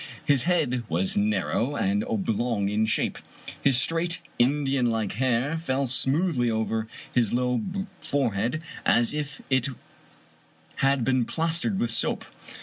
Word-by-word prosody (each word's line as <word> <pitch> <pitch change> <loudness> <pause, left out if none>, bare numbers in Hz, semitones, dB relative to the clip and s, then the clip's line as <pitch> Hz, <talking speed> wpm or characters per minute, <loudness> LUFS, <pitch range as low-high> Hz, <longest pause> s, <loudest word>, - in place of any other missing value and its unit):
His 140 -2 +3
head 145 -9 +1
was 90 +4 +1
narrow 105 +6 0
and 205 +4 +1
oblong 120 - -1
in 110 +2 +1
shape. 110 - 0 0.4
His 135 -3 +4
straight 165 +5 +1 0.2
In 140 +5 +3
dianlike 120 -6 0
hair 130 +6 0
fell 140 -4 -1
smoothly 135 +1 +2
over 110 0 -1 0.3
his 120 -4 +2
low 125 -1 +1 0.4
forehead 125 +2 -1 0.2
as 120 +2 +3
if 150 -1 -5
it 130 -1 +3 1.1
had 135 -3 +2
been 130 -2 +2
plastered 165 - 0
with 120 -7 0
soap. - - 0
130 Hz, 130 wpm, -26 LUFS, 115-150 Hz, 1.1 s, His